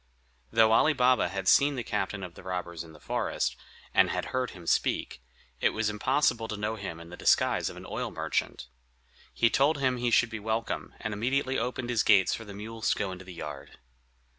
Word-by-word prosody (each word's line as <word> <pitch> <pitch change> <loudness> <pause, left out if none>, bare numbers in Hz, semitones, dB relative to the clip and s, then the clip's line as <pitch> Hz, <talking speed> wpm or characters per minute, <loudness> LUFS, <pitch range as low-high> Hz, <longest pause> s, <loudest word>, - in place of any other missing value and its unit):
Though 110 -1 +4
Ali 155 +7 +5
Baba 125 -7 +3
had 95 0 -4
seen 140 +6 +5
the 125 - -3
captain 100 -2 -2
of 90 -2 -7
the - - -12
robbers 90 -3 -4
in 80 - -13
the 75 - -15
forest, - - -1 0.4
and - - +5
had - - -2
heard 130 -1 0
him 90 -3 -12
speak, 70 - 0 0.4
it - - +2
was 110 -1 0
impossible 120 +1 +1
to 110 - -4
know 105 +2 -2
him 95 -6 -6
in 85 0 -11
the - - -7
disguise - - +2
of - - -10
an - - -10
oil - - -3
merchant. - - -2 0.7
He 115 -1 +2
told 145 +3 +3
him 130 -2 +1
he 120 0 0
should 120 0 +3
be 110 - -4
welcome, 110 +2 -3
and 110 - -3
immediately 130 +5 0
opened 125 +1 -3
his 115 - +2
gates 95 -3 +4
for 115 - -5
the 100 -1 -9
mules 110 +2 -3
to - - +2
go 100 -2 -2
into 95 0 -9
the 95 - -9
yard. 75 -4 -8
110 Hz, 215 wpm, -29 LUFS, 95-125 Hz, 0.7 s, Ali